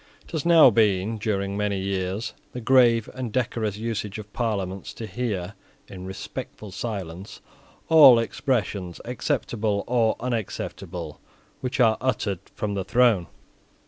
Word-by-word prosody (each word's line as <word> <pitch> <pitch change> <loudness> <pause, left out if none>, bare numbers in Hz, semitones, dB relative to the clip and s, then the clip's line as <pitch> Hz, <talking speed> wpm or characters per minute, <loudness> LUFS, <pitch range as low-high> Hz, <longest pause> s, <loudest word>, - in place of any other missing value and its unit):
It - - -17
has 160 -1 -2
now 165 -6 +8
been, 105 0 +2
during 100 -2 -1
many 100 -1 -1
years, 95 +3 -2 0.2
the 125 - -4
grave 120 -2 +4
and 125 -3 -5
decorous 115 -4 -1
usage 110 -2 -3
of 105 -1 -10
Parliaments 100 -5 -3
to 115 - -6
hear, 105 -3 -3 0.3
in 95 -1 -9
respectful 95 +2 -7
silence, 95 -2 -6 0.5
all 145 -7 +9
expressions, 110 - -1
acceptable 110 -3 -1
or 115 -2 +2
unacceptable, 95 -8 -4 0.4
which 130 0 -3
are 110 -3 +5
uttered 105 -7 -1 0.2
from 105 -3 -2
the 100 -1 -2
throne. 110 -4 +3
110 Hz, 130 wpm, -25 LUFS, 95-120 Hz, 0.5 s, all